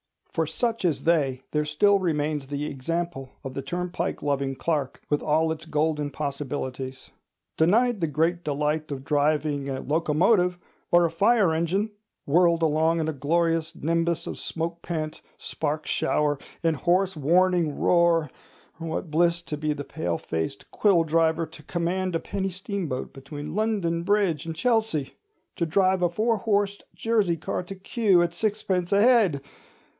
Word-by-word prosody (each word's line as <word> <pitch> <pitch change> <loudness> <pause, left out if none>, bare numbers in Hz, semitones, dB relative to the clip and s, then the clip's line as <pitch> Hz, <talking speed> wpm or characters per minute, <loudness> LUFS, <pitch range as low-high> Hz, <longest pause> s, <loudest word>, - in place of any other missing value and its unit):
For 160 -1 0
such 230 +8 -1
as 160 -5 0
they 140 -6 +1
there 150 0 0
still 200 +7 +3
remains 150 -5 -1
the 145 +1 -3
example 150 0 -3
of 135 - -6
the 135 - -3
turnpike 175 +4 -3
loving 140 -2 0
clerk, 145 -3 -2
with 145 - +1
all 160 +1 +2
its 160 0 -5
golden 150 -2 0
possibilities. 135 -2 -5 0.5
Denied 220 +8 +3
the 165 - +2
great 165 +4 0
delight 150 +1 -1
of 135 -2 -5
driving 145 -1 +1
a 130 -1 -3
locomotive, 175 - +2 0.3
or 175 0 +5
a 165 - 0
fire 200 0 +3
engine—whirled 175 -2 0
along 160 +2 +2
in 160 - -1
a - - -2
glorious 165 +3 0
nimbus 170 +1 0
of - - -6
smoke 170 +1 -4
pant, 155 -3 -4 0.2
spark 155 0 -3
shower, 145 -2 +1 0.2
and 165 -2 +2
hoarse 180 +5 +2
warning 170 +1 +2
roar—what 165 -1 -1
bliss 170 +2 +2
to 150 - -5
the 150 -1 -2
palefaced 85 - -4
quilldriver 165 -4 +3
to 160 -1 -14
command 175 +3 -2
a - - +1
penny 195 +1 -3
steamboat 185 -7 -4
between 145 +2 -7
London 200 -5 0
Bridge 190 -5 +1
and 165 - -4
Chelsea! 220 - 0 0.4
to 170 - +1
drive 185 +2 +2
a 175 - +3
four 220 +6 +1
horsed 205 -1 0
Jersey 215 -7 +1
car 160 - -3
to 195 +2 -8
Kew 195 -2 +2
at 170 0 -2
sixpence 195 -4 -1
a 200 - +5
head! 215 - +4
165 Hz, 145 wpm, -26 LUFS, 150-180 Hz, 0.5 s, or